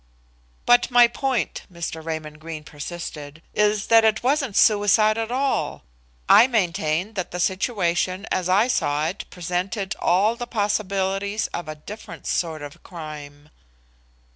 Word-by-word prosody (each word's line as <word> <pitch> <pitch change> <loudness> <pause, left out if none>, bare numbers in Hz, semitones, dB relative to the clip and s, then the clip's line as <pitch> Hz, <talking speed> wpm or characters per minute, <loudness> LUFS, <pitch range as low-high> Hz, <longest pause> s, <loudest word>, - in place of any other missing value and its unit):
"But 245 0 +5
my 245 -1 +7
point," 250 0 -2
Mr. 165 -2 -5
Raymond 155 -1 -5
Greene 155 -1 -7
persisted, 150 0 -8
"is 210 0 +2
that 225 0 +6
it 220 0 +2
wasn't 270 -4 +1
suicide 215 0 +4
at 225 0 -3
all. 270 +2 -1 0.4
I 240 - +8
maintain 180 -4 0
that 185 -4 -3
the 180 - -6
situation 185 -1 0
as 185 -1 0
I 200 +6 +4
saw 150 - 0
it 195 - -7
presented 185 +3 -3
all 200 +6 +3
the 240 0 -6
possibilities 200 -1 -1
of 175 - -4
a 155 - -5
different 170 +1 -10
sort 160 -3 -2
of 145 -1 -10
crime." 150 -3 -10
190 Hz, 140 wpm, -23 LUFS, 165-220 Hz, 0.4 s, I